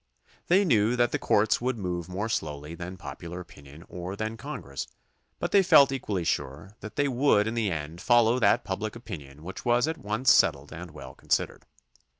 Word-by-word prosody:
They 190 +3 +4
knew 115 - +3
that 120 -1 +2
the - - -1
courts 105 +2 +2
would 125 0 -1
move 90 -3 -4
more 100 +4 -3
slowly 75 -6 -3
than 90 +2 -7
popular 85 +2 -8
opinion 75 -2 -13
or 90 +2 -6
than 110 +2 -3
Congress, 110 - -6 0.5
but - - -3
they 200 - +6
felt 155 -7 +6
equally 105 -9 -2
sure 75 +4 -3
that 110 - -9
they 145 -1 +2
would 125 -5 +3
in 110 - -2
the 115 -3 0
end 80 +2 -5
follow 120 0 +4
that - - +3
public - - -4
opinion 70 +1 -9
which 95 +3 -7
was 120 +3 +2
at 160 0 -3
once 110 +5 +2
settled 70 -1 +2
and 85 +2 -8
well 70 -4 -10
considered. - - -2
100 Hz, 185 wpm, -27 LUFS, 80-120 Hz, 0.5 s, they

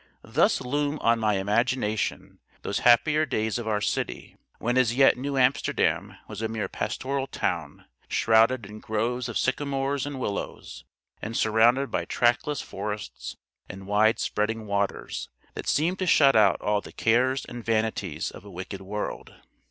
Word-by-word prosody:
Thus - - +2
loom 145 +3 -1
on 115 0 +3
my 105 -2 +2
imagination 105 +2 -1 0.2
those - - -1
happier 135 +6 +4
days 110 -6 -1
of 115 - -6
our 105 -1 0
city, - - -3 0.2
when 120 +2 -1
as 125 -2 +3
yet 135 0 +6
New 140 +2 -3
Amsterdam 130 +2 +1
was 105 0 -7
a 110 - 0
mere 110 -1 -3
pastoral 135 0 -3
town, - - -3 0.2
shrouded 115 +1 +3
in 105 +2 -10
groves 120 +4 -2
of 115 - -2
sycamores 135 +1 -1
and 145 -2 -5
willows, 100 -5 -5 0.4
and 110 +2 -4
surrounded 115 +5 +3
by - - -1
trackless 120 +4 +1
forests 105 -1 -6 0.3
and 95 +1 -9
wide 105 +3 +3
spreading 110 +1 -2
waters, 100 -1 -2 0.2
that - - -7
seemed 170 +5 +1
to 185 - -1
shut 140 -5 +5
out 105 -4 +5
all 105 0 +1
the - - -11
cares 125 +4 +1
and 120 -1 -8
vanities 110 -8 -1
of - - -12
a 100 - -12
wicked 95 +1 -7
world. 105 +2 -5
115 Hz, 155 wpm, -26 LUFS, 105-130 Hz, 0.4 s, yet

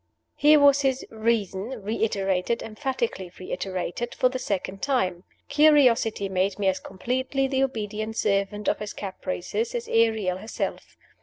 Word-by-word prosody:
Here 300 +1 +6
was 285 -1 +6
his 270 -1 0
"reason," 220 +1 -1
reiterated, 200 -1 0
emphatically 225 -5 -3
reiterated, 185 +4 -4
for 255 - +3
the 255 0 -4
second 195 -4 -3
time! 190 -11 0 0.2
Curiosity 275 -8 +4
made 190 +1 0
me 205 - -2
as 190 - -1
completely 260 +7 -2
the 265 0 0
obedient 215 -3 -3
servant 200 +1 0
of - - +1
his 210 -1 -5
caprices 200 - -4
as 475 -1 -3
Ariel 220 -5 +2
herself. 220 - -5
220 Hz, 135 wpm, -25 LUFS, 195-265 Hz, 0.2 s, Here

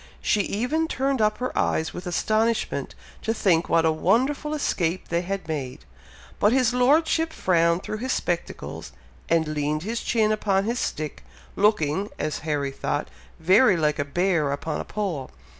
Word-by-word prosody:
She 210 - +2
even 250 +12 -1
turned 270 -4 0
up 215 0 +2
her 255 +1 -4
eyes 160 -1 0
with 180 - -7
astonishment 220 +6 0 0.3
to 225 - -1
think 175 -6 +2
what 165 -1 +3
a 160 - +4
wonderful 275 - +1
escape 185 - -1
they 170 0 +1
had 190 -1 -4
made; 140 -5 -5 0.5
but 210 - +4
his 255 -2 +3
Lordship 320 +6 +3
frowned 170 - +2
through 215 - -4
his 255 +2 -2
spectacles, 175 -6 -3 0.4
and 165 -2 +2
leaned 150 +1 -1
his 230 +4 -3
chin 220 -2 +2
upon 200 -2 +1
his 235 +4 -1
stick, 155 -1 -4 0.3
looking, 195 -2 +2
as 155 0 -2
Harry 145 -3 -2
thought, 145 +2 -3 0.3
very 190 +4 +5
like 150 -1 +1
a - - +2
bear 165 0 +1
upon 150 +2 -3
a - - -8
pole. 180 -11 -3
190 Hz, 160 wpm, -25 LUFS, 160-230 Hz, 0.5 s, very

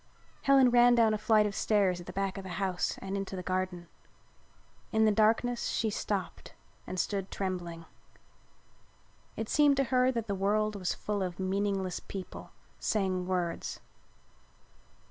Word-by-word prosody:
Helen 270 -2 +5
ran 240 0 +6
down 225 -2 +4
a - - 0
flight 215 0 +4
of 205 - -2
stairs 195 -4 +1
at 175 - -13
the - - -5
back 195 +1 -2
of - - -8
the 185 -2 -7
house 190 -2 -1
and 195 0 -3
into 195 -1 -4
the 180 - -5
garden. 185 -1 -2 1.0
In 220 0 +3
the 215 - +5
darkness 225 +3 +2
she 220 -1 0
stopped 200 -2 -4 0.3
and 185 - -4
stood 195 -1 -2
trembling. 175 -3 -4 1.5
It 225 - -3
seemed 290 +1 +4
to 275 - +3
her 255 0 +4
that 230 -3 -3
the 200 - -2
world 210 +2 +1
was 185 -3 -2
full 205 -1 -3
of 180 -1 -3
meaningless 190 -1 -1
people 190 -2 -8 0.3
saying 185 -4 0
words. 180 -2 -2
200 Hz, 155 wpm, -30 LUFS, 185-220 Hz, 1.5 s, ran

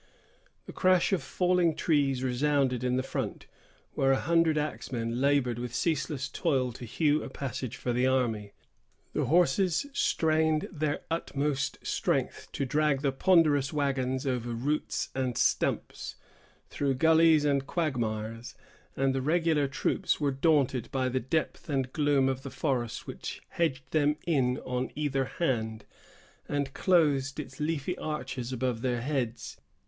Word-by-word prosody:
The - - -9
crash 185 0 +3
of 190 - +1
falling 180 -3 +1
trees 140 -5 +1
resounded 130 -1 +1
in 125 0 +1
the 130 - 0
front, - - -4 0.5
where 135 0 +2
a 135 - +3
hundred 165 -1 +2
axemen 125 -5 -2
labored 135 -4 +2
with 120 0 -5
ceaseless 150 -4 -1
toil 135 -7 0
to 120 - -9
hew 150 +5 +1
a - - -6
passage 130 -3 -5
for 125 - -2
the 125 +2 +2
army. 115 -6 0 0.6
The - - 0
horses 175 - +3
strained 160 - +2
their 155 -3 -2
utmost 145 -4 -1
strength - - -1
to 140 - -1
drag 145 0 +1
the 140 - +2
ponderous 150 -2 +3
wagons 135 -3 -1
over 120 -3 -1
roots 140 +6 -1
and 130 -3 -2
stumps, - - 0 0.5
through 140 -2 -1
gullies 160 +1 +5
and 140 -1 +1
quagmires; 115 -7 -2 0.4
and 135 0 +1
the 135 - -1
regular 155 0 +2
troops 135 - 0
were 145 -2 +1
daunted 135 -4 +2
by 130 -1 0
the 130 +1 0
depth 155 +7 -2
and 135 -3 -1
gloom 145 -3 +3
of 135 0 -1
the 135 - -7
forest 125 -6 -2
which - - -6
hedged 145 -6 -1
them 150 -1 +3
in 130 -6 +2
on 125 0 -2
either 135 -3 0
hand, 110 -9 -2 0.6
and 140 -2 -1
closed 150 -8 +2
its 150 - -8
leafy 155 +2 -1
arches 130 -5 -4
above 125 -2 -1
their 120 -2 -1
heads. 125 -4 -3
135 Hz, 145 wpm, -29 LUFS, 125-155 Hz, 0.6 s, gullies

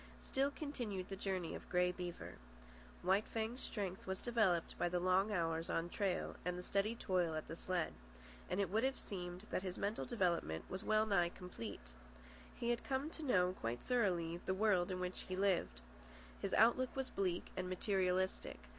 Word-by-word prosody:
Still 270 +1 +1
continued 240 - -4
the 195 - -3
journey 190 -3 -2
of - - -8
Grey 180 0 +3
Beaver. 180 -1 -5 0.7
White 190 +4 +3
Fang's 225 +3 -2
strength 195 -4 -3
was 190 0 -2
developed 215 -8 +2
by 175 - +2
the 180 0 +1
long 185 +3 +3
hours 165 -3 0
on 165 +1 0
trail 190 -1 -1
and 180 0 -1
the 180 - -5
steady 200 +5 +1
toil 180 -7 +1
at 155 - -3
the 165 - -5
sled; 180 0 -1 0.6
and 185 - 0
it 195 -3 +1
would 220 +3 +2
have 265 0 +1
seemed 180 0 -5
that - - +1
his 185 -1 -4
mental 205 +2 -1
development 170 - 0
was 190 +3 -4
well 215 0 +4
nigh 185 -5 +3
complete. 110 - -7 0.6
He 235 0 0
had 240 - -1
come 275 +3 -1
to 320 - -7
know 185 -11 +3
quite 120 -7 -3
thoroughly 180 -9 +1
the 190 - +2
world 195 -3 +3
in 185 -1 -2
which 180 0 -3
he 185 - -1
lived. 190 - +1 0.6
His - - 0
outlook 240 +3 +5
was 265 -1 -2
bleak 180 -3 -1
and 185 -1 -2
materialistic. 185 - 0
185 Hz, 180 wpm, -39 LUFS, 175-215 Hz, 0.7 s, outlook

